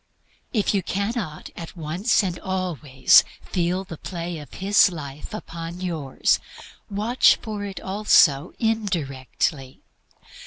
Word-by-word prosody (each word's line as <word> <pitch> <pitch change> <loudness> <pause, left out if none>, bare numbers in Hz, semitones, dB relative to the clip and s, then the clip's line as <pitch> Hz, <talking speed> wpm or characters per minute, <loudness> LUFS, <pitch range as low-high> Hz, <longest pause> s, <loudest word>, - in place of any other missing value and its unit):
If 215 -4 +1
you 200 - +2
cannot 200 -3 -3
at 170 +2 -9
once 170 +9 +1
and 180 -3 -3
always 160 -9 +3 0.2
feel 180 +1 -1
the 170 -5 -9
play 170 -2 -5
of 145 -3 -11
His 200 0 +4
life 145 -3 -8
upon 170 -4 -7
yours, 160 -7 0 0.5
watch 215 +5 +4
for 215 -3 -4
it 195 -2 -6
also 185 -6 +3
indirectly. 155 - -2
180 Hz, 115 wpm, -24 LUFS, 155-200 Hz, 0.5 s, His